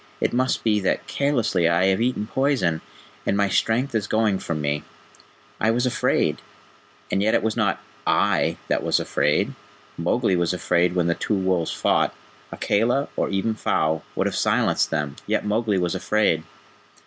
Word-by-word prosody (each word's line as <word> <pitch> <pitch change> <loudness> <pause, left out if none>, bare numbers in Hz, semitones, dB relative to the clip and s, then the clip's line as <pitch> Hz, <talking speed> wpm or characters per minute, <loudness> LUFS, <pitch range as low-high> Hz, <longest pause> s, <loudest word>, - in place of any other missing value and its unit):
"It - - 0
must 130 +1 0
be 105 -2 +2
that 95 - -1
carelessly 115 - +1
I 85 +2 +3
have 95 +3 +2
eaten 120 -3 0
poison, 125 - 0 0.4
and 100 - 0
my 100 0 +3
strength 120 +7 +1
is 110 -3 -1
going 110 -3 +1
from 80 -2 -3
me. 75 0 -1 0.8
I 110 - +2
was 120 +2 +1
afraid 125 - +1 0.7
and 95 - +1
yet 110 +2 +2
it - - +1
was 110 -1 0
not - - +1 0.3
I - - +2
that - - +1
was - - +1
afraid 75 +2 0 0.5
Mowgli 95 +4 +1
was 85 +1 +1
afraid 90 0 +1
when 90 -2 +2
the 85 - +2
two 105 - -1
wolves 95 -3 0
fought. - - +1 0.4
Akela, 120 +7 +1
or - - 0
even 100 +3 0
Phao, 80 -6 0
would - - 0
have - - -1
silenced - - +2
them; 75 -3 -2
yet - - 0
Mowgli 105 -1 +1
was 90 -2 0
afraid. 105 -7 +1
100 Hz, 170 wpm, -23 LUFS, 85-115 Hz, 0.8 s, I